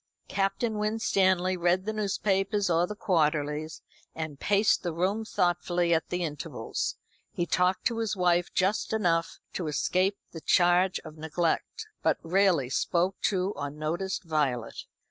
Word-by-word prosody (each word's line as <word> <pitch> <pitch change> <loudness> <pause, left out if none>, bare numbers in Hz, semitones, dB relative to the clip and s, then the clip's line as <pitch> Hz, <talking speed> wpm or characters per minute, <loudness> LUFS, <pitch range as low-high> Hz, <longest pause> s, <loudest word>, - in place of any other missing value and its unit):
Captain 200 +3 0
Winstanley 190 -4 +2
read 180 +1 +1
the 220 - -2
newspapers 200 -1 0
or 170 +1 +3
the 210 - -6
quarterlies, 155 -4 0 0.3
and 155 -3 -5
paced 205 +1 +3
the 175 - -2
room 195 +6 0
thoughtfully 175 -3 +1
at 160 - +1
intervals. 170 -5 -3 0.4
He 175 - -1
talked 180 +1 +1
to 230 -2 +1
his 220 -2 -1
wife 175 -1 +2
just 195 +4 0
enough 170 -6 +1 0.2
to 175 - -3
escape 185 +6 +1
the 165 - -8
charge 180 +3 +3
of 155 0 -10
neglect, 165 - -1 0.2
but - - +2
rarely 180 -5 +3
spoke 175 +8 0
to 190 -1 +1
or 145 0 -3
noticed 160 +7 -3
Violet. 140 -8 -1
180 Hz, 140 wpm, -28 LUFS, 165-195 Hz, 0.4 s, or